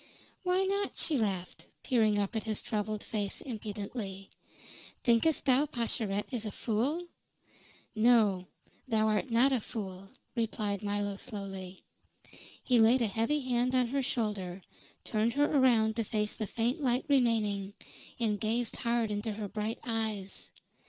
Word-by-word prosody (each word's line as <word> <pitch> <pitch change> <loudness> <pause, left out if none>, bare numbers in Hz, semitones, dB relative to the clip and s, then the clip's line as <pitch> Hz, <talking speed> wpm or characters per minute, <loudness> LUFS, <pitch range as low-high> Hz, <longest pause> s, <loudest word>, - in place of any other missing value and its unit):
"Why 365 +1 +2
not?" 400 +1 -1
she 320 - +2
laughed, 195 -7 -2 0.2
peering 220 -4 +3
up 205 +3 -1
at 220 - +1
his 215 -2 -2
troubled 215 -1 -2
face 205 -3 -2
impudently. 205 -4 -5 0.7
"Thinkest 240 +6 +3
thou 270 +2 +4
Pascherette 225 -6 -1
is 235 -3 -1
a - - -3
fool?" 255 +13 -1 0.9
"No, 215 -5 +4 0.4
thou 220 -3 +2
art 215 +5 0
not 245 +4 +4
a 250 - +1
fool," 195 -3 -6 0.3
replied 215 -3 -1
Milo 205 -1 -2
slowly. 195 -3 -7 0.8
He 245 -2 +4
laid 235 +3 +5
a - - +3
heavy 230 +8 +1
hand 255 0 +1
on 255 -1 +4
her 275 +2 0
shoulder, 210 -8 -2 0.4
turned 225 +1 0
her 290 +2 +3
around 240 -7 +4
to 230 - +1
face 210 0 -1
the 215 - -4
faint 235 +7 0
light 250 -2 +1
remaining, 220 -7 +2 0.4
and 215 -3 +1
gazed 230 +1 -1
hard 235 -2 0
into 210 +2 -2
her 210 0 -4
bright 215 +3 -3
eyes. 220 -4 -3
220 Hz, 145 wpm, -31 LUFS, 205-245 Hz, 0.9 s, laid